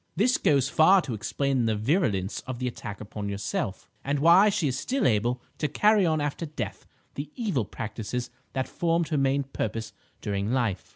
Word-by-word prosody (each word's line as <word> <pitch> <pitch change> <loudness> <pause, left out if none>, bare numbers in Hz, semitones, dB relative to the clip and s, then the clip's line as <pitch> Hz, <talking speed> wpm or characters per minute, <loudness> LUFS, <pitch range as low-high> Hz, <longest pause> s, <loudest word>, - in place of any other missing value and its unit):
This 230 +8 +3
goes 140 -3 +3
far 160 +7 +6
to 125 - -4
explain 125 +4 0
the 110 - +1
virulence 105 - 0
of 130 -2 -4
the 125 +1 -2
attack 105 -4 -6
upon 105 -1 -5
yourself, 100 -1 -3 0.2
and 140 +1 0
why 170 +8 +6
she 180 -6 0
is 130 -1 -1
still 270 +1 -1
able 120 +3 +1 0.2
to 150 - +1
carry 210 +5 +3
on 155 -1 +1
after 145 +3 -2
death 120 -9 -6 0.3
the 140 +1 -5
evil 195 - -1
practices 115 +4 -5 0.2
that 130 -1 -1
formed 165 -2 0
her 155 - 0
main 135 +1 +2
purpose 110 -4 -4 0.3
during 100 +1 -2
life." 120 -7 -1
135 Hz, 180 wpm, -27 LUFS, 110-160 Hz, 0.3 s, far